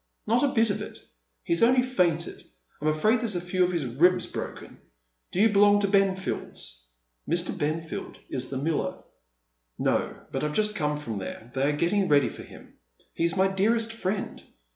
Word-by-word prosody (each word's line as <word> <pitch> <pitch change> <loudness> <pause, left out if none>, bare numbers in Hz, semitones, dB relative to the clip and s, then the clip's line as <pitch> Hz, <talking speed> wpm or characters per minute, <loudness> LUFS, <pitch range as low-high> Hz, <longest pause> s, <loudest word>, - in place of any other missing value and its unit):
" - - -50
Not 235 +3 +2
a 285 - +4
bit 230 -5 +2
of - - -3
it. - - -7 0.5
He's 170 - 0
only 250 +2 +5
fainted. 175 -10 0 0.4
I'm 150 - -1
afraid 215 +10 +3
there's 220 -5 -2
a - - +1
few 180 +1 0
of 180 - +1
his 170 -6 -1
ribs 175 +9 +3
broken. - - -7 0.5
Do 180 - -2
you 220 +2 +6
belong 205 0 +5
to 200 - +2
Benfield's? 190 - -1 0.2
" - - -18
^Ir. 170 +2 0
Benfield 160 +2 -3
is 130 -1 -4
the 135 - -3
miller. 155 +4 -2 0.4
" - - -51
No. - - -2
but 135 - -2
I've 150 0 -2
just 210 0 +1
come 150 -6 -1
from 115 -8 -5
there, 110 +5 -8
they 135 +2 +1
are 145 - -1
getting 185 +5 +2
ready 145 -5 +4
for - - -10
him. - - -14 0.4
He's 170 +2 0
my 190 +1 +4
dearest 225 +4 +1
friend. 200 -2 -3
175 Hz, 190 wpm, -27 LUFS, 145-205 Hz, 0.5 s, you